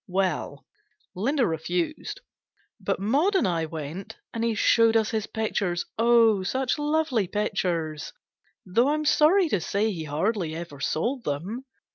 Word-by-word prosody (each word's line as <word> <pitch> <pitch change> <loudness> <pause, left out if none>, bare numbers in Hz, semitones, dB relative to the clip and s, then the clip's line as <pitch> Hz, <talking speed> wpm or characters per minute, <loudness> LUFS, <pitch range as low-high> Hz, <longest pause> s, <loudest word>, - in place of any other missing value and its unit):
Well, 180 -6 -1 0.5
Linda 245 +8 +1
refused; 175 - -2 0.6
but - - -1
Maud 285 - +2
and 375 - +3
I 165 -3 0
went, 165 +7 -7 0.2
and 230 - -2
he 230 -1 +1
showed 225 +1 +4
us 220 0 +1
his 220 -2 -2
pictures 200 -5 -1
oh, 230 -3 +5
such 260 +9 -1
lovely 295 - +1
pictures 170 - -2
I - - -42 0.5
though 230 +8 +2
I'm 305 +1 0
sorry 310 +5 +5
to 200 - 0
say 210 +6 0
he 165 -5 -5
hardly 160 +2 -1
ever 165 -4 -7
sold 235 - -1
them. 185 - -4
210 Hz, 145 wpm, -26 LUFS, 170-245 Hz, 0.6 s, oh